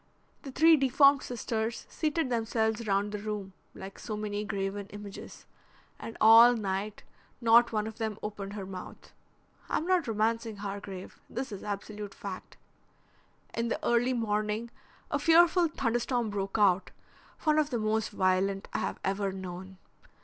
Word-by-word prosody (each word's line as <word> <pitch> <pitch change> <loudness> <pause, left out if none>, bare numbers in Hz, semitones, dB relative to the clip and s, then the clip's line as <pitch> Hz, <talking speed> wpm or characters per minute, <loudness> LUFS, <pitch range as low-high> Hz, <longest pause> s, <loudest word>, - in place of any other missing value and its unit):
The 275 - -8
three 320 +4 +6
deformed 275 +1 +5
sisters 230 -2 -3
seated 310 -3 -1
themselves 225 -1 0
round 200 +1 +1
the 210 - -4
room, 205 -2 -5 0.2
like 195 +1 -9
so 215 -2 -5
many 210 -1 -3
graven 200 -1 -3
images, 205 -1 -10 0.5
and 225 - -8
all 230 +2 +8
night 200 -1 -3 0.4
not 235 0 +5
one 215 -1 0
of 220 +1 -8
them 220 -2 -2
opened 205 -1 -5
her 200 -2 -5
mouth. 185 -1 -10 0.6
I'm 315 - 0
not 365 -4 +2
romancing, 225 +1 0
Hargrave; 200 -2 -7
this 260 -1 -4
is 200 - -7
absolute 205 0 -6
fact. 195 -2 -8 1.0
In 230 0 -1
the - - -1
early 240 +2 +2
morning 215 0 -1 0.4
a - - +1
fearful 340 +1 +5
thunderstorm 240 -4 -1
broke 195 0 -3
out, 190 -3 +3 0.5
one 310 -1 +3
of 300 -1 +1
the 245 - -1
most 220 0 0
violent 195 0 0
I - - 0
have - - -3
ever 195 0 0
known. 190 0 -8
215 Hz, 150 wpm, -29 LUFS, 200-235 Hz, 1.0 s, all